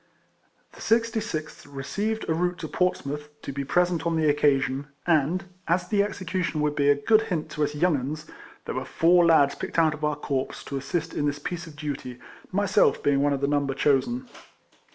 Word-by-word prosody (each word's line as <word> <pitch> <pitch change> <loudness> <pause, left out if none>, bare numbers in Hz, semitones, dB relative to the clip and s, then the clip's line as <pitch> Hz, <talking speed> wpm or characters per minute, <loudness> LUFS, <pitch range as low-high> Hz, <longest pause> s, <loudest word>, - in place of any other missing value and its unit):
The - - -14
66th 225 -11 -1
received 205 +11 -3
a 160 - +2
route 175 +2 0
to 160 - -5
Portsmouth, 150 -4 -1
to 140 - -5
be 140 +1 -3
present 175 +3 +1
on 165 0 0
the 160 -1 +2
occasion, 140 -2 +2 0.2
and, 165 +2 +2 0.2
as 175 +2 +1
the 205 -2 +3
execution 185 -4 -2
would 150 0 0
be 145 -1 +3
a 145 - +6
good 215 +10 +3
hint 165 -5 -3
to 150 - -1
us 150 0 -1
young 170 +2 +3
'uns, 145 +4 -4 0.4
there - - -4
were - - -3
four 175 +2 +4
lads 145 -4 +5
picked - - -6
out 160 -2 +4
of 155 0 -9
our 150 -1 +1
corps 140 -2 -3
to 140 - -4
assist 160 +4 -3
in 145 - 0
this 145 0 -1
piece 175 +3 -5
of 155 - -12
duty, 145 -4 -5 0.3
myself 200 0 +2
being 140 -1 +3
one 145 0 +2
of 140 -1 -1
the 140 - +1
number 140 -2 0
chosen. 240 - +1
155 Hz, 195 wpm, -26 LUFS, 145-180 Hz, 0.4 s, a